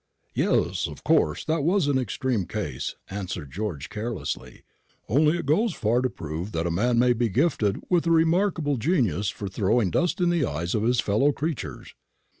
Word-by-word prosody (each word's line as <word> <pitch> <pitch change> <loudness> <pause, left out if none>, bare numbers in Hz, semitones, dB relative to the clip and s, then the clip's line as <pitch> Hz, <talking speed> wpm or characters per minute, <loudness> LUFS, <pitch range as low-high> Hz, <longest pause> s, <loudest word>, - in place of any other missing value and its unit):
"Yes; 85 +2 +1
of 75 -3 -10
course 160 0 +2
that 160 -2 0
was 180 +2 +2
an 140 -2 +2
extreme 125 -4 -1
case," - - -4 0.2
answered 90 -7 -5
George, 90 -5 -4
carelessly. 110 0 -5 0.4
"Only 150 - +3
it - - -4
goes 175 +8 +2
far 115 +3 +1
to 130 - +1
prove 80 +2 -6
that 80 +1 -1
a 85 - 0
man 120 +8 +1
may 125 +1 +4
be 120 -1 0
gifted 110 - +1
with 175 -2 +2
a - - +3
remarkable 165 -3 +2
genius 110 - +1
for 100 -1 -5
throwing 100 +1 +1
dust 175 +3 +1
in 175 -1 +3
the 170 -3 +1
eyes 85 - -2
of 110 - +1
his 120 +2 +2
fellow 110 +9 +2
creatures." 145 - -5
120 Hz, 180 wpm, -25 LUFS, 95-155 Hz, 0.4 s, may